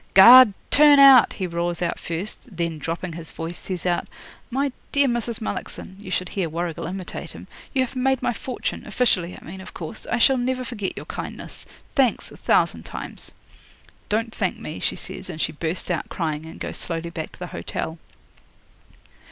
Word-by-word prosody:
'"Guard, 235 +2 +10 0.2
turn 295 -1 +8
out," 270 -4 +8
he 190 - -3
roars 170 0 -2
out 175 -1 -1
first; 185 +4 -5
then, 170 -2 -2
dropping 165 +3 -4
his 165 -1 -7
voice, 165 +2 -6
says 185 -2 -5
out, 175 -1 0 0.4
"My 275 +2 0 0.2
dear 280 0 +4
Mrs. 235 -1 -1
Mullockson" 190 -3 -5
(you 200 -2 -9
should 185 0 -1
hear 185 -5 -2
Warrigal 165 0 -3
imitate 185 +1 -6
him), - - -10 0.3
"you 265 - +2
have 255 - -12
made 265 0 +2
my - - +1
fortune 255 +2 -4
officially, 180 -8 +1
I - - -16
mean, 190 +3 -8
of - - -11
course. 170 +6 -7
I 245 - 0
shall 255 +2 +4
never 255 +1 -1
forget 215 -6 -4
your - - -6
kindness. - - -7 0.3
Thanks, 260 -4 +2
a - - -12
thousand - - +2
times." - - -6 0.8
'"Don't 225 +2 0
thank - - -1
me," - - -7
she - - 0
says, - - -6
and 160 -3 -6
she 160 - 0
burst 165 +4 -3
out 170 - -2
crying, 160 -2 -3
and 160 - -10
goes - - -5
slowly 170 0 -3
back 160 -2 -6
to - - -13
the 180 - -5
hotel. 160 +1 -4
185 Hz, 185 wpm, -24 LUFS, 170-245 Hz, 0.8 s, Guard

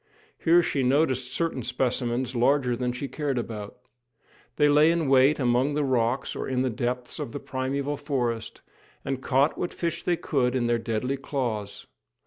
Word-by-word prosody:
Here 170 +1 +5
she 140 - -1
noticed 130 -1 +1
certain 165 -6 -1
specimens, 125 +1 -1
larger 125 0 +2
than 125 0 -1
she 125 +3 -5
cared 145 -2 -2
about. 110 -3 -5 0.8
They 150 - +4
lay 150 +2 +5
in 165 -3 +1
wait 135 +2 +5
among 130 +3 +2
the 150 - +1
rocks 130 -1 0
or - - -4
in 130 -1 0
the 130 - 0
depths 125 +1 -3
of 115 - -5
the 145 - -4
primeval 140 +2 -3
forest, 120 -6 -3 0.4
and 135 -1 -2
caught 135 +3 +2
what 175 - -3
fish 170 0 -2
they 175 -1 0
could 130 -6 0
in 125 -2 +1
their 120 0 +1
deadly 115 +4 -2
claws. 120 -7 -4
130 Hz, 170 wpm, -26 LUFS, 120-145 Hz, 0.8 s, Here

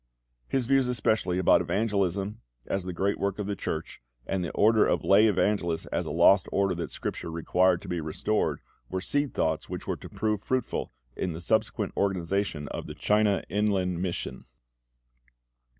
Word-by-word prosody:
His 130 -2 0
views 135 0 +3
especially 110 -6 0
about 95 - +5
evangelism 100 +2 -1 0.2
as 95 -2 -2
the 90 - -3
great 95 +3 -1
work 100 -1 -1
of 105 - -3
the 100 0 -2
Church, - - -5 0.2
and 95 -2 -1
the 85 - -2
order 110 +1 +5
of - - +1
lay 105 +3 +6
evangelists 95 -6 +1
as - - -1
a - - -3
lost 100 0 +5
order 100 -1 +2
that 85 -2 -4
Scripture - - -5
required 90 +2 +2
to - - -9
be 85 -2 -2
restored, 80 +8 -1 0.3
were 95 - -2
seed 145 +8 -1
thoughts 80 -1 0
which - - -5
were - - -2
to - - -10
prove 105 -2 -1
fruitful 130 +2 -2 0.2
in 90 - -2
the 80 - -6
subsequent 110 +6 0
organisation 95 -5 -1
of - - -5
the - - -7
China 105 -1 +2
Inland 95 -3 0
Mission. 90 -2 -4
100 Hz, 170 wpm, -28 LUFS, 90-105 Hz, 0.3 s, lay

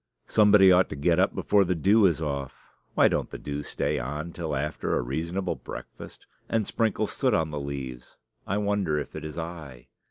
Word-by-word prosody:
Somebody 105 -3 +6
ought 90 0 +4
to - - -5
get 85 +4 +2
up 95 - +2
before 100 -1 +3
the 90 -1 0
dew 100 +5 +5
is 80 -2 -1
off 70 -3 -3 0.4
(why - - +6
don't - - -1
the - - -7
dew 70 0 -5
stay - - -2
on 75 +7 -4
till 80 -4 -3
after 75 +3 -1
a - - 0
reasonable 85 +8 -2
breakfast?) - - -10 0.2
and 110 -2 +1
sprinkle 110 -1 0
soot 125 +2 +1
on 80 -2 0
the 75 - -3
leaves. 65 -3 -7 0.3
I 100 - 0
wonder 100 -6 0
if 75 - -5
it - - -6
is 75 0 -7
I. 80 -7 -7
80 Hz, 195 wpm, -27 LUFS, 70-95 Hz, 0.4 s, Somebody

